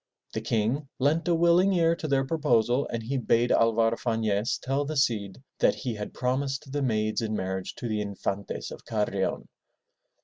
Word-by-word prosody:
The -, -, -2 dB
King 120 Hz, +6 st, -1 dB
leant 155 Hz, +6 st, +1 dB
a 170 Hz, -, +3 dB
willing 170 Hz, +3 st, +4 dB
ear 165 Hz, -2 st, +3 dB
to 155 Hz, -, -4 dB
their 135 Hz, -2 st, +2 dB
proposal, 130 Hz, -4 st, +2 dB
and 115 Hz, -1 st, -4 dB
he 135 Hz, +5 st, -2 dB
bade 120 Hz, -1 st, +2 dB
Alvar 115 Hz, 0 st, +3 dB
Fanez 110 Hz, -2 st, 0 dB
tell 135 Hz, +2 st, -1 dB
the 150 Hz, +1 st, -4 dB
Cid 110 Hz, -4 st, 0 dB, 0.2 s
that -, -, +4 dB
he 125 Hz, -4 st, -3 dB
had 105 Hz, -1 st, -6 dB
promised 135 Hz, +2 st, -2 dB
the 145 Hz, +1 st, -1 dB
maids 110 Hz, -4 st, 0 dB
in 110 Hz, -1 st, -2 dB
marriage 95 Hz, -1 st, -3 dB
to 120 Hz, -, -5 dB
the 110 Hz, -2 st, -1 dB
Infantes 100 Hz, -1 st, -4 dB
of -, -, -9 dB
Carrion. 105 Hz, -3 st, -1 dB
120 Hz, 175 wpm, -27 LUFS, 110-140 Hz, 0.2 s, willing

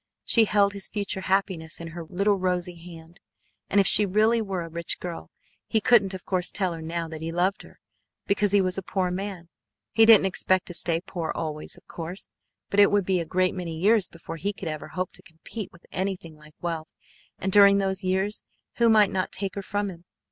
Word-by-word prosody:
She 230 Hz, -2 st, +5 dB
held 200 Hz, -1 st, +3 dB
his 200 Hz, -1 st, -1 dB
future 200 Hz, -2 st, -3 dB
happiness 185 Hz, -4 st, -1 dB
in 165 Hz, 0 st, -7 dB
her 170 Hz, +1 st, -7 dB
little 195 Hz, +5 st, +1 dB
rosy 180 Hz, -1 st, -1 dB
hand, 170 Hz, +1 st, -13 dB, 0.5 s
and 205 Hz, -, +3 dB
if 195 Hz, -, +4 dB
she 210 Hz, -, +6 dB
really 215 Hz, +4 st, +3 dB
were 190 Hz, -4 st, -3 dB
a -, -, -7 dB
rich 170 Hz, 0 st, -2 dB
girl 175 Hz, -2 st, -7 dB, 0.4 s
he 220 Hz, -, +2 dB
couldn't 205 Hz, -4 st, +4 dB
of 185 Hz, -, -10 dB
course 185 Hz, -1 st, 0 dB
tell 185 Hz, -4 st, -1 dB
her 165 Hz, -, -7 dB
now 165 Hz, +1 st, -3 dB
that 160 Hz, -1 st, -8 dB
he 165 Hz, +1 st, -4 dB
loved 185 Hz, +4 st, 0 dB
her, -, -, -16 dB, 0.5 s
because 200 Hz, 0 st, +1 dB
he 200 Hz, -1 st, +5 dB
was 185 Hz, 0 st, 0 dB
a -, -, -6 dB
poor 185 Hz, 0 st, -1 dB
man. 185 Hz, -2 st, -5 dB, 0.4 s
He 225 Hz, 0 st, +5 dB
didn't 220 Hz, -4 st, +8 dB
expect 185 Hz, -1 st, +1 dB
to 175 Hz, -, -8 dB
stay 165 Hz, -1 st, +1 dB
poor 175 Hz, -3 st, -4 dB
always, 155 Hz, -2 st, -5 dB
of -, -, -19 dB
course, 170 Hz, +3 st, -7 dB, 0.4 s
but 200 Hz, -, +2 dB
it 200 Hz, -, +7 dB
would 205 Hz, -2 st, +1 dB
be 185 Hz, -1 st, +1 dB
a 170 Hz, -, -3 dB
great 185 Hz, +2 st, +1 dB
many 170 Hz, -3 st, -5 dB
years 205 Hz, +3 st, +4 dB
before 165 Hz, 0 st, -9 dB
he 200 Hz, +5 st, -2 dB
could 195 Hz, -, -7 dB
ever 155 Hz, -1 st, -5 dB
hope 185 Hz, -1 st, -4 dB
to -, -, -10 dB
compete 175 Hz, +6 st, -9 dB
with 170 Hz, -, -19 dB
anything 185 Hz, -4 st, -4 dB
like 150 Hz, 0 st, -18 dB
wealth, 165 Hz, -2 st, -4 dB, 0.5 s
and 190 Hz, -, -2 dB
during 200 Hz, 0 st, +7 dB
those 195 Hz, 0 st, -1 dB
years 190 Hz, +3 st, 0 dB, 0.4 s
who 235 Hz, -1 st, +4 dB
might 215 Hz, -2 st, +5 dB
not 185 Hz, -1 st, -1 dB
take 195 Hz, -1 st, -1 dB
her 200 Hz, -, -4 dB
from 205 Hz, 0 st, -2 dB
him? 175 Hz, -1 st, -14 dB
185 Hz, 220 wpm, -26 LUFS, 170-200 Hz, 0.5 s, didn't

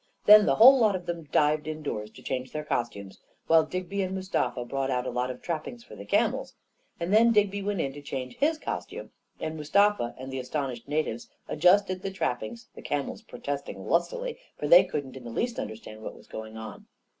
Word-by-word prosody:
Then 210 Hz, 0 st, +9 dB
the -, -, +4 dB
whole 260 Hz, +4 st, +9 dB
lot 215 Hz, -4 st, +4 dB
of 180 Hz, -1 st, -5 dB
them 170 Hz, -2 st, -4 dB
dived 150 Hz, +1 st, +2 dB
indoors 150 Hz, -9 st, -4 dB
to -, -, -14 dB
change 130 Hz, -1 st, -3 dB
their 150 Hz, -, -4 dB
costumes, 110 Hz, -8 st, -3 dB, 0.3 s
while 160 Hz, -1 st, +5 dB
Digby 185 Hz, +4 st, -3 dB
and 190 Hz, 0 st, -2 dB
Mustafa 185 Hz, -10 st, -1 dB
brought 135 Hz, +2 st, -2 dB
out 125 Hz, -1 st, 0 dB
a -, -, -2 dB
lot 125 Hz, +1 st, -1 dB
of 125 Hz, -, -7 dB
trap* 160 Hz, -3 st, -3 dB
pings 235 Hz, -1 st, -9 dB
for -, -, -12 dB
the 100 Hz, 0 st, -9 dB
camels; -, -, 0 dB, 0.4 s
and 170 Hz, +4 st, -1 dB
then 230 Hz, +2 st, +6 dB
Digby 205 Hz, -2 st, +2 dB
went 200 Hz, -3 st, -1 dB
in 135 Hz, -, -2 dB
to 145 Hz, -, -9 dB
change 130 Hz, -3 st, -6 dB
kis 310 Hz, +3 st, +2 dB
costume, -, -, -6 dB, 0.3 s
and 155 Hz, -, -4 dB
Mustafa 160 Hz, -2 st, +2 dB
and 130 Hz, +1 st, -7 dB
the 130 Hz, -, -2 dB
astonished 130 Hz, -2 st, -4 dB
natives 145 Hz, -6 st, -2 dB, 0.2 s
adjusted 185 Hz, +2 st, +3 dB
the 195 Hz, -, -3 dB
trappings, 190 Hz, -, -3 dB
the -, -, -11 dB
camels 145 Hz, -1 st, -3 dB
protest 140 Hz, 0 st, -5 dB
ing -, -, -8 dB
lustily, -, -, 0 dB, 0.2 s
for -, -, -3 dB
they -, -, +9 dB
couldn't 135 Hz, -3 st, -5 dB
in 130 Hz, -, -10 dB
the 120 Hz, -, -7 dB
least 235 Hz, -, -2 dB
understand 110 Hz, 0 st, -7 dB
what -, -, -7 dB
was -, -, -16 dB
going 110 Hz, 0 st, -8 dB
on. 110 Hz, 0 st, -9 dB
155 Hz, 210 wpm, -27 LUFS, 125-200 Hz, 0.4 s, Then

